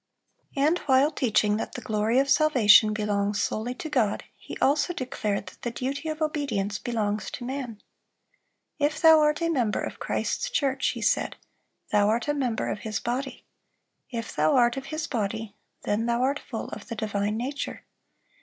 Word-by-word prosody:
(315) 275 - +1
And 325 +4 +3
while 265 +3 +5
teaching 215 -6 +2
that - - -4
the 250 - -6
glory 220 +2 0
of 275 +1 +3
salvation 240 -8 +6
belongs 205 -1 0
solely 240 +4 -2
to 320 - -6
God, 245 -9 0
he - - -9
also 290 +5 +2
declared 215 - -2
that - - -13
the 240 - -2
duty 275 +6 -3
of 310 0 -2
obedience 225 -10 -1
belongs 215 -3 -2
to 240 - -7
man. 255 -4 -5 1.0
"If 300 +2 +1
thou 320 -1 +7
art 300 +1 +2
a 335 - +1
member 245 -10 0
of - - -6
Christ's - - -2
church," 270 -2 0
he - - -2
said, - - +1 0.6
"thou 205 0 +4
art 230 +5 0
a 295 - +2
member 250 -6 -1
of - - -4
His 215 -2 -3
body; 255 +3 -4 0.6
if 230 -3 -5
thou 155 +1 +3
art 240 -2 +4
of 270 0 -5
His 310 +2 -3
body, 220 -2 -3 0.3
then 220 +3 0
thou 235 +1 +1
art 280 +2 +1
full - - -6
of - - -9
the 230 - -5
divine 210 0 -1
nature.... 270 +5 -4
240 Hz, 180 wpm, -26 LUFS, 215-280 Hz, 1.0 s, thou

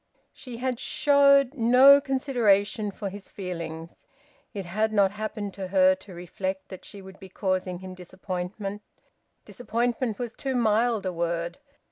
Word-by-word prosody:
She 245 -3 -9
had 250 0 -2
showed 280 -2 +4
no 260 +3 +7
consideration 235 -6 +1
for 200 0 -5
his 200 +1 -10
feelings. 170 -3 -7 0.4
It 200 -4 -6
had 215 +5 -1
not 200 -3 +3
happened 210 -1 -5
to 190 0 -6
her 185 0 +4
to 190 +1 -11
reflect 190 +2 -5
that 185 - -10
she 200 -2 -10
would 190 0 -13
be 190 -2 -12
causing 185 -1 -2
him 185 +1 -9
disappointment. 185 +2 -6 0.6
Disappointment 240 -2 -2
was 240 -2 -5
too 270 -2 -4
mild 225 -2 +1
a 185 - -2
word. 170 +3 -3
205 Hz, 145 wpm, -26 LUFS, 185-240 Hz, 0.6 s, no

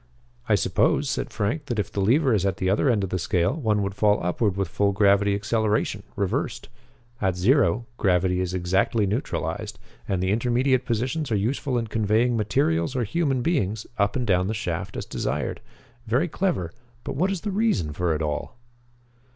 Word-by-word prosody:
"I - - +5
suppose," - - +1
said - - -2
Frank, 110 +10 -2
"that 120 - -2
if 105 - -2
the 100 - -2
lever 130 +6 +3
is 100 -4 +2
at 95 -1 0
the 95 -2 0
other 120 +7 +2
end 110 -5 +2
of 95 - -3
the 95 - -1
scale 90 -1 +1
one 110 -9 0
would 100 0 -2
fall 105 +1 +3
upward 95 +3 0
with 95 -2 0
full 100 +3 +1
gravity 100 0 +3
acceleration 110 +1 0
reversed. 100 -2 -2 0.5
At 95 -3 +1
zero, 120 +4 +3
gravity 90 -1 +2
is 90 0 -2
exactly 95 +4 +1
neutralized, 105 +8 -3 0.3
and 95 - 0
the 95 - +1
intermediate 125 +3 +1
positions 125 +4 -1
are - - +3
useful 125 +5 -1
in 115 - -1
conveying 110 +2 +1
materials 95 - +1
or 125 - +1
human 135 +1 0
beings 110 - 0
up 100 0 +2
and 125 -2 -1
down 90 -3 +2
the 110 - -2
shaft 90 -6 -4
as - - -4
desired. - - -3 0.5
Very 125 +10 +2
clever; 165 - -1 0.3
but - - -5
what 180 +7 +1
is 195 -3 -2
the 210 - -3
reason 190 - 0
for 85 0 0
it 80 - -2
all?" 75 +9 -3
105 Hz, 185 wpm, -25 LUFS, 95-125 Hz, 0.5 s, I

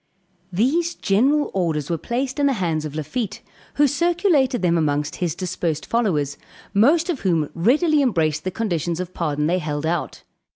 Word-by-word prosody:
These 300 - +1
general 270 +10 +2
orders 165 -5 -1
were 165 - 0
placed 260 +3 -3
in 285 - +3
the 275 - +2
hands 165 -8 -1
of 150 -1 -6
Lafitte, 210 - -4 0.3
who 290 - +4
circulated 310 - +2
them 170 -1 +3
among 150 -2 +1
his 175 -3 -2
dispersed 175 -4 -3
followers, 155 - 0 0.3
most 290 +11 +4
of 340 -7 -2
whom 165 -6 +1
readily 295 - +3
embraced 155 - +1
the 185 - -1
conditions 175 -5 -2
of 185 0 -5
pardon 150 -3 -1
they 175 +4 +1
held 150 -2 -3
out. 165 0 -2
185 Hz, 165 wpm, -22 LUFS, 160-265 Hz, 0.3 s, who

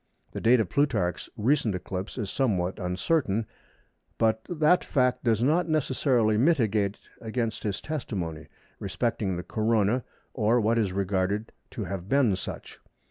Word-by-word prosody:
The - - -5
date 120 +2 +5
of 110 - +1
Plutarch's 105 -9 0
"recent" 115 -2 +2
eclipse 95 +3 -5
is 105 -6 -3
somewhat 95 -8 0
uncertain, 100 - 0 0.7
but 110 -1 +2
that 170 +1 +3
fact 125 -3 +1
does 115 -2 +2
not 165 +5 +2
necessarily 130 -7 +2
militate 110 -9 +2 0.2
against 115 0 -2
his 105 -2 -2
testimony 90 - -4 0.3
respecting 105 -5 -1
the 90 - -4
Corona 110 +3 +1 0.3
or 115 +1 +2
what 115 +1 +2
is 100 -4 +1
regarded 100 +2 -1 0.2
to - - -5
have 95 -1 -5
been 135 -8 +3
such. 95 - -8
110 Hz, 135 wpm, -27 LUFS, 100-125 Hz, 0.7 s, date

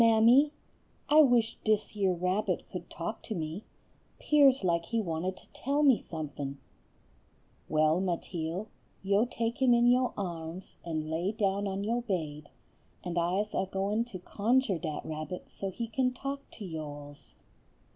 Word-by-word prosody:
"Mammy, 230 +6 +6 0.6
I 305 +1 +8
wish 240 -5 +3
dis 215 -1 +1
yer 195 -3 +2
rabbit 180 +4 0
could - - -6
talk - - -5
to 220 - -5
me; 160 +4 -4 0.5
'pears 275 -5 +5
like 170 -2 +1
he 230 +6 -1
wanted 180 -1 -2
to - - -16
tell 285 +3 0
me 270 -5 +5
somefin'." 145 -3 -5 1.1
"Well, 155 +3 +3
Mateel, 175 0 -2 0.4
yo 200 +3 +3
take 235 +1 -3
him 250 -2 +6
in 235 0 +4
yo 250 +1 +3
arms 175 -2 -5
and 155 -2 -3
lay 170 +5 0
down 200 -1 0
on 195 +1 -2
yo 235 +3 0
baid, 155 -9 -3 0.5
and 175 -1 -4
I's 190 +5 0
a 190 - -1
goin' 200 +4 0
to 240 -6 -8
conjur' 210 +2 +1
dat 155 -3 -4
rabbit 155 +3 -6
so 195 - -4
he 230 +5 -4
kin 250 +2 0
talk 275 +2 -5
to 210 - -8
yo 160 -3 -4
alls." 145 -1 -10
195 Hz, 155 wpm, -30 LUFS, 165-235 Hz, 1.1 s, I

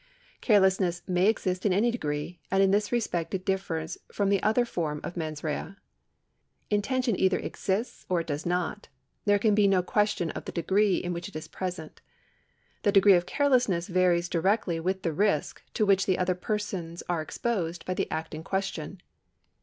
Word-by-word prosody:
^ - - -41
Carelessness 190 -5 +3
may 180 +1 +2
exist 185 -4 0
in 205 - +2
any 215 +6 +3
degree, 150 -5 -4
and 195 +1 +3
in 190 - +4
this 205 +1 +1
respect 200 -7 -1
it 185 - -5
differs 170 -5 -2
from 200 -1 0
the 200 -1 +2
other 220 +3 +2
form 160 -9 -3
of - - -5
mens 155 -3 -4
rea. 160 +4 -3 1.0
Intention 235 +3 +1
either 190 -1 +3
exists 205 +5 -3
or 180 -2 +2
it - - -8
does 145 +1 -3
not; 180 +3 -2 0.4
there 205 -1 +4
can 210 +1 +2
be 205 -1 +4
no 190 -2 +3
question 205 -3 0
of - - -7
the - - -5
degree 195 +3 +2
in 175 0 -3
which 170 +3 -5
it 200 - -19
is 155 - -6
present. 180 -4 -6 0.8
The 205 - +3
degree 200 0 +7
of 175 -1 +2
carelessness 250 -12 +2
varies 180 -1 +2
directly 180 0 +1
with 190 +3 -2
the 165 - 0
risk 195 -3 0
to 215 - +2
which 195 -1 +3
other 185 0 +2
persons 180 -3 -4
are 175 -2 0
exposed 175 -2 -3
by 185 - -1
the - - -2
act 160 +1 -4
in 155 +1 -6
question. 190 -2 -3
185 Hz, 185 wpm, -28 LUFS, 170-205 Hz, 1.0 s, degree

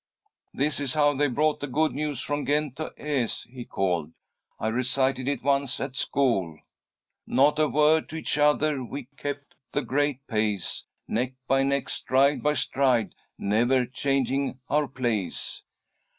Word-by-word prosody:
"This 145 +2 0
is 140 -1 -1
how 145 -1 +4
they 145 +1 +2
brought 150 +4 +1
the 145 - -4
good 155 +4 +1
news 145 -3 -2
from 145 0 -2
Ghent 145 -2 0
to 155 - -4
Aix," 140 -6 -1
he 125 0 -9
called. 90 -5 -1 0.5
"I 110 - 0
recited 130 +2 +1
it 140 -3 -1
once 140 -1 +1
at 135 -1 -4
school! 100 - 0 0.7
"'Not 145 +3 +3
a 155 - +4
word 155 +2 +3
to - - -7
each 160 -2 -1
other; 150 -1 +3
we 130 +1 -7
kept 145 0 -5 0.2
the 145 - 0
great 140 -1 0
pace, 105 -5 -1 0.2
Neck 125 +3 -1
by 135 0 +3
neck, 140 0 0
stride 140 +2 +2
by 150 0 +2
stride, 125 -6 +1 0.2
never 120 +5 +2
changing 135 +1 0
our 150 0 +2
place.'" 120 -8 -2
135 Hz, 150 wpm, -26 LUFS, 125-145 Hz, 0.7 s, how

